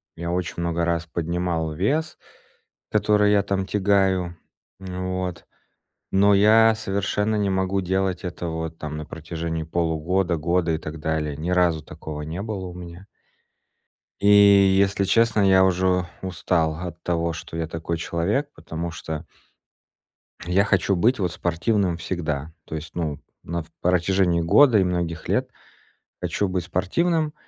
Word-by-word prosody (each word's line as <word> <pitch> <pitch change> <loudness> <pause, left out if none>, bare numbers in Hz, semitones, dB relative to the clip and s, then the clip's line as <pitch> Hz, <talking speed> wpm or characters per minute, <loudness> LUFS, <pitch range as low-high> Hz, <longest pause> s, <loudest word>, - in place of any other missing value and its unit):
Я 85 +1 -4
очень 90 -1 -2
много 85 0 0
раз 85 -1 -1
поднимал 85 -1 -2
вес, 150 - -1 0.7
который 105 -1 +3
я 100 -1 +3
там 95 -1 -1
тягаю, 95 -3 +1 0.4
вот, 90 -2 -4 0.7
но 100 +1 +5
я 110 +3 +6
совершенно 105 +1 -1
не 100 -2 +1
могу 95 +1 0
делать 95 0 -1
этого 85 -2 -4
вот 80 0 -7
там 75 0 -5
на 75 - -5
протяжении 80 0 -5
полугода, 85 +2 0
года 85 +2 0
и 80 - -1
так 80 +1 -7
далее. 75 -2 -2
Ни 80 +4 -3
разу 90 -3 +2
такого 75 0 -8
не 80 +5 -5
было 105 -3 -4
у 90 - -8
меня. 90 +1 -10 1.1
И, 100 - +3 0.5
если 100 0 +2
честно, 115 +2 +3
я 95 -1 +5
уже 90 -1 +2
устал 85 -3 0
от 85 -1 -7
того, 85 -1 0
что 80 - -8
я 80 -1 -2
такой 85 +1 -4
человек, 90 - -1
потому 85 +1 -5
что 80 -2 -6 1.2
я 95 +3 +3
хочу 100 -2 +2
быть 120 +9 +3
вот 90 -4 -1
спортивным 90 +1 0
всегда. 80 -4 -3
То - - -8
есть, 80 0 -7
ну, 80 -4 -2 0.2
на 85 0 -3
в - - -18 0.2
протяжении 90 0 +2
года 110 +8 +5
и 95 - +4
многих 85 -2 -2
лет - - 0 0.7
хочу 100 - -1
быть 90 -1 -2
спортивным, 150 - 0
90 Hz, 145 wpm, -23 LUFS, 85-95 Hz, 1.2 s, я